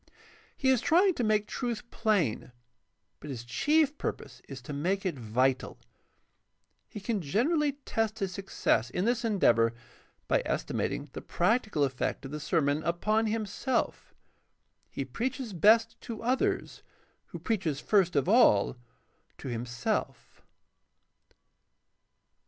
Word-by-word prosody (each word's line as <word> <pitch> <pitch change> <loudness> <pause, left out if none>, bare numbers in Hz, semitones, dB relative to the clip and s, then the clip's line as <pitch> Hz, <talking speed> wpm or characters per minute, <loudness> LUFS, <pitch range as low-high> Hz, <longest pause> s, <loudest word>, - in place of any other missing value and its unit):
He 265 - +1
is 255 -3 +2
trying 365 +6 +4
to 245 - -2
make 215 -1 +2
truth 240 0 -4
plain, 195 - 0 0.7
but 150 - -9
his 125 -4 -5
chief 295 - +2
purpose - - -5
is 135 -1 -7
to 145 - -7
make 185 +8 -1
it 185 - 0
vital. 125 +3 0 1.1
He 210 - -7
can 210 0 -2
generally 285 - +1
test 225 -1 -1
his 195 -3 -2
success 190 - 0
in 180 +9 -2
this 240 0 +1
en 220 -3 0
deavor 115 -6 +4 0.5
by - - +2
estimating 145 -1 -2
the - - -6
practical 210 - +1
effect 135 +1 -2
of 135 - -7
the 150 - -4
sermon 150 -1 +1
upon 215 +7 +1
himself. 225 +4 -2 0.8
He - - -4
preaches 255 -2 -4
best 225 +6 +4
to 230 -3 -7
others 255 +3 0 0.5
who - - -8
preaches 185 - -1
first 185 -1 +2
of 140 +3 +2
all 185 - +4 0.6
to 135 - -7
himself. 120 0 -3
200 Hz, 130 wpm, -29 LUFS, 140-230 Hz, 1.1 s, trying